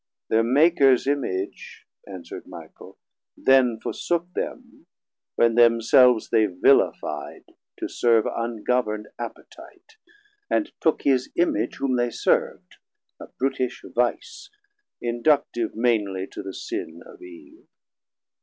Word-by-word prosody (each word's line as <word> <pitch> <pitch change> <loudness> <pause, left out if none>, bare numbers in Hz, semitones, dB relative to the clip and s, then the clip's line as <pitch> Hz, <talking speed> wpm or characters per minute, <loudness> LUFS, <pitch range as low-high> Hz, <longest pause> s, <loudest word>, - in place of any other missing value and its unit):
Thir 110 - +4
Makers 135 +1 +4
Image, 130 -9 -4 0.2
answerd 95 -3 -9
Michael, - - -13 0.4
then 130 -4 +3
Forsook 175 +6 -3
them, - - -7 0.5
when 115 -1 +3
themselves 115 +1 +4
they 110 -1 +3
villifi'd 90 -2 0 0.3
To - - -4
serve 115 -2 +2
ungovern'd 115 -2 -2
appetite, 445 - -11 0.5
and 310 - 0
took 160 - +1
His 130 -2 +1
Image 120 -10 0
whom 130 -2 -1
they 120 0 +1
serv'd, - - -1 0.4
a - - -10
brutish 130 -1 -3
vice, 125 - -2 0.5
Inductive 120 -1 0
mainly 105 -5 0
to - - -7
the 95 -1 -8
sin 355 +2 -6
of 450 -7 -15
Eve. 330 -1 -15
125 Hz, 105 wpm, -24 LUFS, 115-145 Hz, 0.5 s, Thir